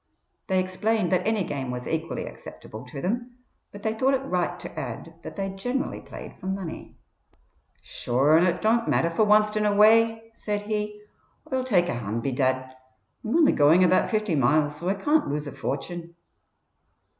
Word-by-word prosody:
They 190 -1 +2
explained 185 +2 0
that 185 +2 +1
any 220 -3 +1
game 140 -5 -4
was 125 0 -5
equally 160 0 -3
acceptable 110 +3 -10
to 135 +2 -7
them, 240 +6 -3 0.3
but 205 - -11
they 220 - 0
thought 260 +5 +2
it 270 +1 -3
right 180 -8 -1
to - - -7
add - - -6
that - - -9
they 195 -1 -2
generally 245 +8 -3
played - - -10
for - - -7
money. 190 -3 -5 0.9
"Sure 135 +6 +2
an' 170 +3 +5
it 175 - -1
don't 230 +2 +2
matter 170 - +2
for 215 +6 +2
wanst 210 0 +4
in 215 - +1
a 205 -1 +2
way," 225 +1 +4
said 210 -2 -3
he 210 0 -3 0.5
"Oi'll 260 -1 +1
take 190 -9 +2
a - - -1
hand 115 -1 -3
bedad 130 -1 0 0.5
Oi'm 220 - -1
only 325 -3 +5
going 155 +6 +5
about 185 +1 +3
fifty 215 -4 0
miles, 150 +2 +2
so 170 +4 -3
Oi 195 - +1
can't 295 +10 +2
lose 150 +1 -2
a 145 - -6
fortune." 170 +5 -5
190 Hz, 180 wpm, -25 LUFS, 150-220 Hz, 0.9 s, an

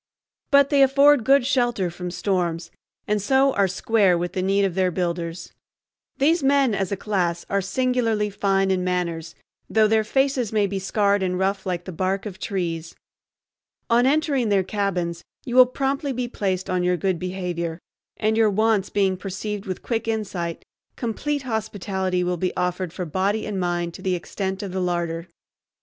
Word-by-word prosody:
But 280 0 +5
they 280 -1 +4
afford 275 0 +5
good 275 +2 +4
shelter 240 -9 +1
from 180 +1 -6
storms, 175 -3 -2 0.4
and 210 0 +1
so 265 +5 +3
are 200 -1 +3
"square" 195 -1 +2
with 175 +1 -3
the 185 - -1
need 195 +1 +2
of 190 - -1
their 185 0 +2
builders. 170 -1 -3 0.6
These 315 +5 +3
men 275 -3 +3
as 195 -1 -1
a 200 - -1
class 180 -5 -1
are 200 0 +2
singularly 225 0 0
fine 195 -1 +1
in 185 -1 0
manners, 170 -3 -2 0.3
though 220 -1 +4
their 220 0 +3
faces 265 0 +1
may 210 -2 +2
be 195 0 -2
scarred 200 +1 +1
and 180 -1 0
rough 195 +1 -1
like 175 -1 -2
the 185 - -6
bark 190 +4 -1
of 190 -3 -7
trees. 170 -5 -3 1.0
On 240 +2 +5
entering 280 -5 +1
their 195 -2 +3
cabins 180 -4 -2 0.2
you 245 - -4
will 255 -1 +8
promptly 275 +2 -1
be 250 0 -2
placed 190 -5 -2
on 185 -1 0
your 180 0 +1
good 185 0 -1
behavior, 180 -3 -3 0.4
and, 215 0 +1
your 220 -1 +4
wants 215 -1 +1
being 195 -2 +1
perceived 200 +2 -5
with 185 - -5
quick 230 -1 -2
insight, 195 -7 -3 0.3
complete 275 +5 -2
hospitality 195 -5 -2
will 180 0 -1
be 180 +1 -2
offered 180 -1 -1
for 180 +1 -5
body 195 +6 -1
and 205 -3 -3
mind 175 -1 -1
to - - -10
the 185 -1 0
extent 190 +2 -4
of 195 - -5
the 185 0 -2
larder. 170 -1 -2
195 Hz, 175 wpm, -23 LUFS, 180-225 Hz, 1.0 s, will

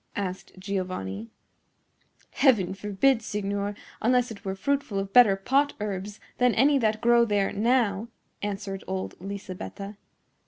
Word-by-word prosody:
asked 190 -2 -4
Giovanni. 185 - -4 1.0
"Heaven 230 -10 +3
forbid, 210 +6 +2
signor, 205 -1 -2 0.3
unless 250 +1 +2
it 200 -2 -10
were 190 -2 -3
fruitful 280 -1 -1
of 195 0 -3
better 235 -6 +7
pot 275 +9 +1
herbs 205 0 -4 0.2
than 250 -1 +4
any 280 +3 +4
that 215 -2 +1
grow 235 0 +5
there 205 -3 +1
now," 225 -1 +1 0.3
answered 200 -1 -4
old 190 0 -3
Lisabetta. 200 +1 -7
205 Hz, 125 wpm, -27 LUFS, 195-235 Hz, 1.0 s, better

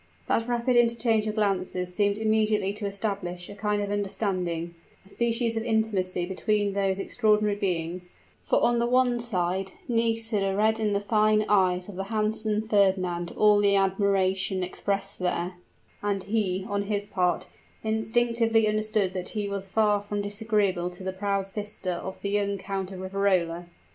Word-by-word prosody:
That 230 - +1
rapid 245 +1 +1
interchange 230 -2 +3
of 215 - -2
glances 185 -3 -1
seemed 205 +1 +1
immediately 215 -2 +1
to 205 0 -3
establish 195 -3 -4
a - - -7
kind 205 0 -1
of 200 - -3
understanding 185 -4 -2 0.3
a - - -17
species 230 +1 0
of 225 - 0
intimacy 210 -6 0
between 205 +2 0
those 195 -1 0
extraordinary 210 0 +2
beings; 180 -2 -2 0.3
for - - +1
on 240 0 +3
the 235 - +1
one 250 -1 +3
side, 190 -4 -2
Nisida 225 -4 +1
read 220 +2 +2
in 215 -2 +1
the 200 - +2
fine 215 +1 +2
eyes 185 -3 +2
of 200 -3 -9
the 195 - -3
handsome 215 0 -1
Fernand 185 -4 +1
all 210 -1 +5
the 200 -1 +4
admiration 195 -1 +1
expressed 195 +2 -3
there, 180 0 -1 0.5
and 200 -2 -1
he, 195 -3 -1
on 205 -2 -1
his 205 0 0
part, 180 -3 0 0.4
instinctively 225 0 +2
understood 215 -2 0
that 185 -1 -4
he 205 -1 -1
was 200 -1 -4
far 210 0 +2
from 205 0 -3
disagreeable 205 -4 +1
to 180 +1 -9
the 190 0 -3
proud 200 0 -1
sister 205 -1 -2
of 190 +2 -5
the 200 - -1
young 200 -1 0
Count 195 0 -4
of 185 -1 -7
Riverola. 185 -3 0
200 Hz, 160 wpm, -27 LUFS, 190-215 Hz, 0.5 s, all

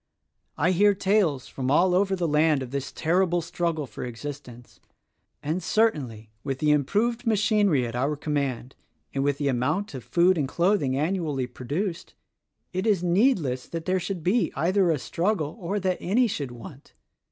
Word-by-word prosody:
I 165 +6 +2
hear 200 +3 +4
tales 190 -9 +1
from 130 -1 -4
all 175 +6 +4
over 195 +1 +2
the 175 -2 -1
land 150 -2 +2
of 125 - -9
this 140 -1 -4
terrible 175 +2 +1
struggle 170 -2 -2
for 110 - -8
existence; 125 -1 -8 0.6
and 160 +5 -1
certainly, 135 - 0
with 135 -2 -3
the 150 +2 +2
improved 225 - +1
machinery 205 - +2
at 115 0 -5
our 140 +5 0
command 140 -4 -3 0.4
and 135 - 0
with 140 -1 +1
the 145 -1 -1
amount 145 - -1
of 130 -3 -7
food 175 +4 +3
and 140 - 0
clothing 170 -4 +1
annually 155 -4 -1
produced 150 - -4 0.6
it 185 +4 -1
is 195 -5 +2
needless 175 - +1
that 165 -1 -6
there, 185 0 +1
should 180 -2 -4
be 185 +1 +2
either 180 +5 +2
a 160 - +2
struggle 165 +1 -1
or 195 +3 -2
that 185 -1 -1
any 235 +7 +2
should 145 - -3
want. 130 +4 -12
165 Hz, 165 wpm, -26 LUFS, 140-190 Hz, 0.6 s, hear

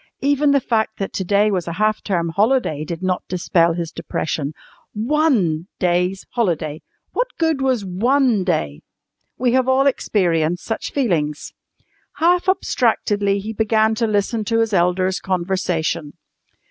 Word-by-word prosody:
Even 285 +1 +2
the 280 0 +4
fact 225 -3 -1
that 195 - -4
to 190 - -2
day 205 +3 +2
was 180 -4 -2
a 170 - -3
half 215 +4 0
term 170 -4 -1
holiday 200 - +1
did 170 +3 -6
not 185 -1 0
dispel 170 -2 +2
his 170 -1 -4
depression. 155 -3 -3 0.4
One 220 - +1
day's 180 +1 0
holiday! 165 -9 -1 0.3
What - - 0
good 320 -4 +1
was 255 -6 +1
one 235 +3 +2
day? 115 - -1 0.6
We 245 0 +1
all 260 0 +3
have 270 - +3
experienced 175 - +1
such 225 - -3
feelings. 160 - -1 0.6
Half 355 +3 +2
abstractedly 205 - +1
he 220 +2 -5
began 220 0 +2
to 225 +1 0
listen 215 +1 0
to 225 +1 +1
his 225 -1 -1
elders' 185 +1 +1
conversation. 175 -4 -2
200 Hz, 145 wpm, -20 LUFS, 175-240 Hz, 0.6 s, the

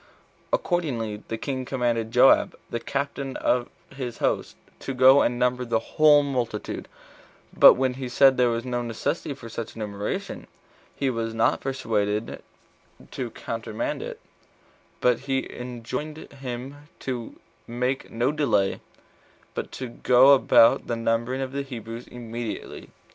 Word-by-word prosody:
Accordingly 120 - -1
the 115 - -3
king 130 +2 -3
commanded 120 -3 -1
Joab, 125 +3 +5 0.2
the 120 - -2
captain 140 +1 -3
of 125 -1 +1 0.3
his 125 -3 -5
host, - - -1 0.2
to 135 - -5
go 130 +2 +7
and 120 - +1
number 125 0 +1
the 115 -2 +1
whole 145 +5 +4
multitude; 125 -6 -3 0.7
but - - +9
when 130 0 0
he 130 -1 -5
said 135 +1 +5
there 125 -1 +3
was 115 +1 -2
no 120 -1 -2
necessity 135 +6 -3
for 120 -4 -10
such 115 0 -6
a - - -13
numeration, 105 -2 -4 0.5
he 135 -2 0
was 115 -1 -3
not 115 - +2
persuaded 110 -5 -2 0.7
[to 125 -3 -4
countermand 115 -1 -4
it], - - -7 0.8
but 125 -2 +3
he 135 0 -2
enjoined 125 +5 -5 0.2
him 135 +2 -7
to 125 -3 -5 0.3
make 125 +3 -2
no 120 +4 0
delay, 110 -11 +1 0.7
but - - -5
to 130 - -5
go 125 +3 +5
about 115 -3 +5
the 120 - -1
numbering 115 +3 -1
of 130 -1 -3
the 140 +1 -2
Hebrews 115 -3 -7
immediately. 120 -2 -6
125 Hz, 140 wpm, -25 LUFS, 115-135 Hz, 0.8 s, but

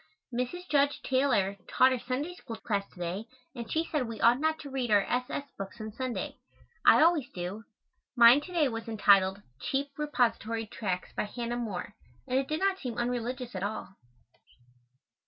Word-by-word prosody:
Mrs. 255 +10 -3
Judge 285 -1 +2
Taylor 240 -8 +2
taught 260 +1 +5
our 255 - -2
Sunday 265 +8 -3
School 240 -10 -8
class 205 -3 -2
to - - -18
day 180 +5 -3 0.3
and 235 -4 -7
she 320 +1 +1
said 290 -7 -1
we 225 -2 -6
ought 240 +2 +5
not 315 +1 +1
to 285 - -8
read 260 -3 -2
our 205 -2 +5
S. 250 +4 0
S. - - -3 0.2
books 195 +4 -6
on 215 0 -5
Sunday. 255 +2 -4 0.5
I - - +7
always 320 -5 +3
do. 185 +5 -5 0.5
Mine 240 +3 +8
to 360 - -10
day 330 -5 +3
was 225 -2 -5
entitled, 200 -3 +4 0.2
"Cheap 275 +1 -1
Repository 230 -6 0
Tracts 190 -4 -4
by - - 0
Hannah 235 +2 -4
More," 210 -4 -4 0.3
and 255 - +2
it 270 - -2
did 310 +1 -1
not 390 -1 +2
seem 240 -4 -5
unreligious 245 +1 -2
at 185 - -4
all. 200 -1 -4
240 Hz, 180 wpm, -30 LUFS, 215-275 Hz, 0.5 s, Mine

